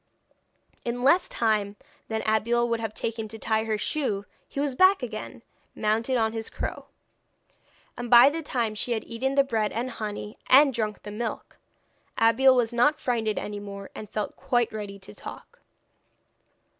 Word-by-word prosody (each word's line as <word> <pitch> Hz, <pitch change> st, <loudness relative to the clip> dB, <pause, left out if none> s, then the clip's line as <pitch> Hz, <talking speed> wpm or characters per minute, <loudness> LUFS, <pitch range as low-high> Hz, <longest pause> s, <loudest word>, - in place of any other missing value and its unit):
In 245 Hz, +1 st, -3 dB
less 340 Hz, +8 st, +4 dB
time 210 Hz, -3 st, 0 dB, 0.3 s
than 220 Hz, 0 st, -2 dB
Abeille 230 Hz, +2 st, +2 dB
would 230 Hz, -1 st, 0 dB
have 225 Hz, -1 st, -3 dB
taken 225 Hz, -1 st, -3 dB
to 220 Hz, +1 st, -9 dB
tie 220 Hz, 0 st, 0 dB
her 220 Hz, -1 st, 0 dB
shoe 210 Hz, -5 st, -2 dB, 0.2 s
he -, -, -6 dB
was 285 Hz, -1 st, 0 dB
back 375 Hz, +2 st, +5 dB
again, 230 Hz, 0 st, -6 dB, 0.3 s
mounted 225 Hz, +4 st, +1 dB
on 220 Hz, -1 st, +1 dB
his 225 Hz, -1 st, -4 dB
crow. -, -, -5 dB, 1.1 s
And 240 Hz, 0 st, -5 dB
by 245 Hz, +3 st, +8 dB
the 325 Hz, +2 st, -3 dB
time 235 Hz, -7 st, -1 dB
she 235 Hz, +3 st, -2 dB
had 220 Hz, -, -2 dB
eaten 265 Hz, +4 st, -2 dB
the 275 Hz, -, +5 dB
bread 220 Hz, -5 st, -1 dB
and 245 Hz, +3 st, -3 dB
honey 210 Hz, -2 st, -6 dB
and 275 Hz, +1 st, +7 dB
drunk 215 Hz, -3 st, -3 dB
the 205 Hz, -, -7 dB
milk, 225 Hz, +2 st, -5 dB, 0.6 s
Abeille 255 Hz, +4 st, +5 dB
was 240 Hz, -2 st, +1 dB
not 295 Hz, +6 st, +3 dB
frightened 225 Hz, -4 st, -1 dB
any 205 Hz, 0 st, -4 dB
more, 200 Hz, -1 st, -8 dB
and 210 Hz, -, -8 dB
felt 210 Hz, -1 st, -3 dB
quite 240 Hz, -3 st, 0 dB
ready 205 Hz, -2 st, -6 dB
to 190 Hz, -, -12 dB
talk. 475 Hz, -, -11 dB
230 Hz, 170 wpm, -26 LUFS, 215-250 Hz, 1.1 s, by